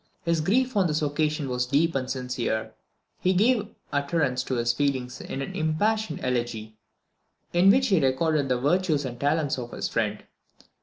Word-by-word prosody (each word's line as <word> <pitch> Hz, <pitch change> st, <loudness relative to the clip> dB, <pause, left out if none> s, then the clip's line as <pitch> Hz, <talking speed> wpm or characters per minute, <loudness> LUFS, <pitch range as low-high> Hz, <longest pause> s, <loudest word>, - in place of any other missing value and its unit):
His 170 Hz, -1 st, +1 dB
grief 250 Hz, +9 st, +1 dB
on 195 Hz, -3 st, +3 dB
this 155 Hz, 0 st, -1 dB
occasion 150 Hz, 0 st, 0 dB
was 125 Hz, -1 st, -1 dB
deep 160 Hz, +5 st, +2 dB
and 130 Hz, -1 st, -2 dB
sincere, 125 Hz, -3 st, -1 dB
and -, -, -12 dB, 0.5 s
he 185 Hz, -, +2 dB
gave 215 Hz, +2 st, +3 dB, 0.3 s
utterance 140 Hz, -3 st, 0 dB
to 130 Hz, -, -2 dB
his 120 Hz, 0 st, +1 dB
feelings 130 Hz, -2 st, -1 dB
in 135 Hz, -, -4 dB
an -, -, -6 dB
impassioned 170 Hz, +3 st, 0 dB
elegy, 120 Hz, -3 st, -2 dB, 0.8 s
in 175 Hz, +3 st, +5 dB
which 260 Hz, +5 st, +4 dB
he 185 Hz, -7 st, +3 dB
recorded 140 Hz, +2 st, +1 dB
the 125 Hz, -, +2 dB
virtues 150 Hz, +2 st, +1 dB
and 120 Hz, -2 st, -6 dB
talents 145 Hz, -1 st, +1 dB
of 120 Hz, -1 st, -7 dB
his -, -, -2 dB
friend. 105 Hz, -2 st, -2 dB
145 Hz, 170 wpm, -26 LUFS, 125-170 Hz, 0.8 s, in